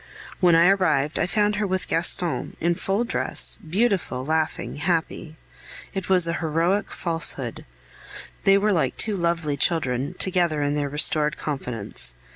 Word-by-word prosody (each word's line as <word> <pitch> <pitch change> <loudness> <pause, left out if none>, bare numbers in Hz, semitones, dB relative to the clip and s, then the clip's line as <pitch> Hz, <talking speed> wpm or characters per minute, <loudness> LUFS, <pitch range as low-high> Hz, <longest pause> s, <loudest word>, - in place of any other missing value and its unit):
When 175 -3 +4
I 165 +1 +5
arrived, 175 -6 +1
I - - 0
found 205 +3 0
her 210 -1 -1
with 185 0 -2
Gaston, 170 0 +1
in 170 +1 +1
full 195 +6 -2
dress, 245 - +2
beautiful, 180 - -1
laughing, 155 -1 -2
happy. 160 -1 -3 0.6
It 195 -1 -5
was 180 -3 +5
a 165 - -1
heroic 170 +5 0
falsehood! 165 -2 -2 0.8
They 195 -1 +5
were 210 +1 +1
like 165 - -1
two 215 -2 +2
lovely 170 -5 -1
children 135 -4 -1
together 175 -5 0
in 145 0 -1
their 145 -1 -2
restored 150 +1 +1
confidence. 120 - -1
170 Hz, 145 wpm, -23 LUFS, 150-190 Hz, 0.8 s, I